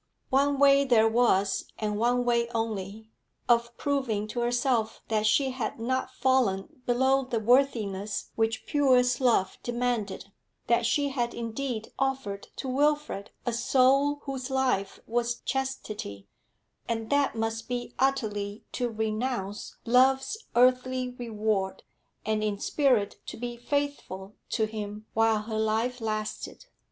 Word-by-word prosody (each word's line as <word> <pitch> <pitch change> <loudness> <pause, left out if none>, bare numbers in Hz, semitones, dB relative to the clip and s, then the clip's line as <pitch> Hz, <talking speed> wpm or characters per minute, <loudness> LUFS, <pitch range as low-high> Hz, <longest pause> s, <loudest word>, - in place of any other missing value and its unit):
One 280 +1 +3
way 280 0 +6
there 235 -5 +4
was, 220 -4 +2
and 210 -1 -2
one 245 +3 +2
way 235 -1 +2
only, 220 -1 -3 0.4
of 235 0 +2
proving 255 -8 -1
to 240 - -3
herself 240 -1 0
that 215 -1 +2
she 265 +5 +3
had 255 -3 -4
not 260 +3 -1
fallen 255 -5 0
below 265 +2 +3
the 240 -3 -1
worthiness 215 -4 +1
which 225 0 0
purest 255 -3 +3
love 225 -7 +2
demanded, 235 -5 -2 0.3
that 235 0 +2
she 285 +4 +1
had 240 -3 -2
indeed 230 0 -4
offered 265 -8 -2
to 270 - -5
Wilfrid 290 -5 0 0.2
a 240 - 0
soul 275 +4 +3
whose 270 -2 -4
life 255 -7 0
was 240 +1 0
chastity 215 - -4 0.6
and 225 -1 -2
that 285 -3 +2
must 225 0 -2
be 245 -1 -4
utterly 215 -6 -1
to 245 -1 -1
renounce 220 -2 -3
love's 265 - +3
earthly 255 +1 +3
reward, 215 -5 -2 0.4
and 215 0 0
in 210 -1 0
spirit 250 -3 +1
to - - -6
be 240 +1 -4
faithful 240 -7 -3 0.2
to 220 - +1
him 215 -1 -6
while 225 -1 +3
her 220 0 -3
life 225 +3 0
lasted. 215 - -4
235 Hz, 130 wpm, -28 LUFS, 215-260 Hz, 0.6 s, way